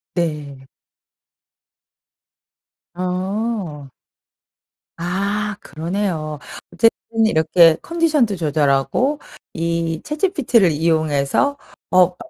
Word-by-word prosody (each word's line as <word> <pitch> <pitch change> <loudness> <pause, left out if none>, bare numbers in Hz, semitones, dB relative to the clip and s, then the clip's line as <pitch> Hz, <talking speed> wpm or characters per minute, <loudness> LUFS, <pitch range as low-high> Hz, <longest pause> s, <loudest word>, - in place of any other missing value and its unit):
네. 150 -6 -3 2.3
어. 185 -3 -3 1.1
아 200 +4 -1
그러네요. 160 -3 -3 0.3
어쨌든 225 0 +1
이렇게 160 -2 +5
컨디션도 315 -10 +1
조절하고 155 - +1 0.3
이 165 -1 -2
ChatGPT를 295 - +2
이용해서 160 - +1 0.3
업무 180 -1 +4
175 Hz, 175 characters per minute, -20 LUFS, 155-220 Hz, 2.3 s, 이렇게